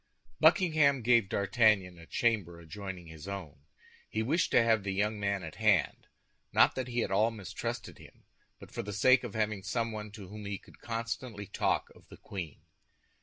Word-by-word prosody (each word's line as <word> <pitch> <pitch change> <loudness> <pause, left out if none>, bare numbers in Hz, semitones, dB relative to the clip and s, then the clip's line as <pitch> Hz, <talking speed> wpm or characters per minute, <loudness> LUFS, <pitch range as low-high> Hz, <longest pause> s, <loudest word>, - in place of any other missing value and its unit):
Buckingham 155 - +4
gave 115 -4 +4
D'Artagnan 100 -4 +2
a 85 - -13
chamber 100 -8 0
adjoining 90 +1 -7
his 80 +1 -11
own. 80 -8 -7 0.4
He 110 - -1
wished 155 +10 +1
to 115 - +5
have 110 -2 +3
the 95 -1 -3
young 105 +2 0
man 100 -2 -1
at 80 - -8
hand—not 110 -4 +1
that 130 -1 -3
he 120 -1 0
at - - -4
all 105 +4 +3
mistrusted 110 -5 -6
him, - - -16 0.3
but - - -13
for - - -3
the 105 - -6
sake 130 +5 +5
of 120 -4 -6
having 110 -2 0
someone 110 +1 -3
to 105 -3 -9
whom 105 +2 -9
he 100 -1 -3
could - - -19
constantly 115 -2 -4
talk - - -1
of - - -20
the - - -13
queen. 85 -7 -7
105 Hz, 175 wpm, -31 LUFS, 95-115 Hz, 0.4 s, to